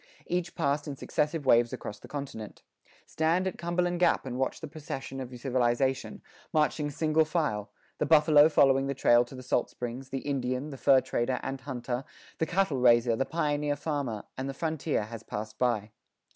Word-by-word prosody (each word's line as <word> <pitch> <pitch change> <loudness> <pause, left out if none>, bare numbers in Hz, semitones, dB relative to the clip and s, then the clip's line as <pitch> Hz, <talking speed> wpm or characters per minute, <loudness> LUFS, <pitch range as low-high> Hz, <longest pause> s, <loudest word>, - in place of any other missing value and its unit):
Each 175 -1 -2
passed 140 +2 0
in 145 - -4
successive 150 +2 -1
waves 120 -2 +5
across 105 - -6
the - - -12
continent. 135 -7 -7 0.4
Stand 165 +4 +1
at 190 - -3
Cumberland 175 +1 0
Gap 175 -5 +3
and 125 -2 -4
watch 130 - -1
the 160 - -6
procession 145 -3 -6
of 130 -2 -5
civilization, 125 -1 0 0.3
marching 150 -1 +1
single 155 +2 +2
file 150 - -1 0.3
the 150 - 0
buffalo 150 -1 +6
following 135 -3 +4
the 140 - -2
trail 120 -2 +5
to 120 +2 -12
the 130 - -9
salt 125 -1 0
springs, 125 +2 -6
the 135 - -3
Indian, 130 +1 -2
the 135 - -7
fur 135 -1 +5
trader 125 -1 -1
and 135 0 -4
hunter, 125 -1 -4 0.4
the 160 - +1
cattle 180 -7 +1
raiser, 120 -1 +5
the 135 - 0
pioneer 150 -3 0
farmer 140 -8 -3 0.2
and 135 +1 -3
the 135 - -5
frontier 155 -5 -1
has 110 0 -8
passed 110 +1 -6
by. 110 -4 0
135 Hz, 180 wpm, -29 LUFS, 125-155 Hz, 0.4 s, buffalo